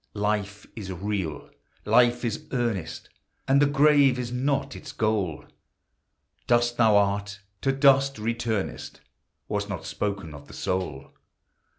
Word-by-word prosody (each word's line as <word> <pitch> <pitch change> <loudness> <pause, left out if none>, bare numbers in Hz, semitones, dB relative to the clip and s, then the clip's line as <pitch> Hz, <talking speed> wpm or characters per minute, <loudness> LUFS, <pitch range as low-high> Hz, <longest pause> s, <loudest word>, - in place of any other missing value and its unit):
Life 105 0 -2
is 100 -5 -6
real! 95 -4 -4 0.3
Life 120 0 +4
is 115 -3 -3
earnest! 115 -10 -2 0.4
And 140 +1 +4
the 145 - +5
grave 145 -2 +4
is 120 -1 -4
not 135 +2 -1
its - - -9
goal; 105 -8 -1 1.0
Dust 120 0 +2
thou 110 -3 +5
art, 100 0 0 0.2
to 135 - +2
dust 135 0 +4
returnest, 110 -2 -3 0.5
Was 105 0 -2
not 90 -5 -5
spoken 100 -6 -3
of 70 0 -12
the - - -12
soul. 85 -8 -3
110 Hz, 125 wpm, -26 LUFS, 100-125 Hz, 1.0 s, the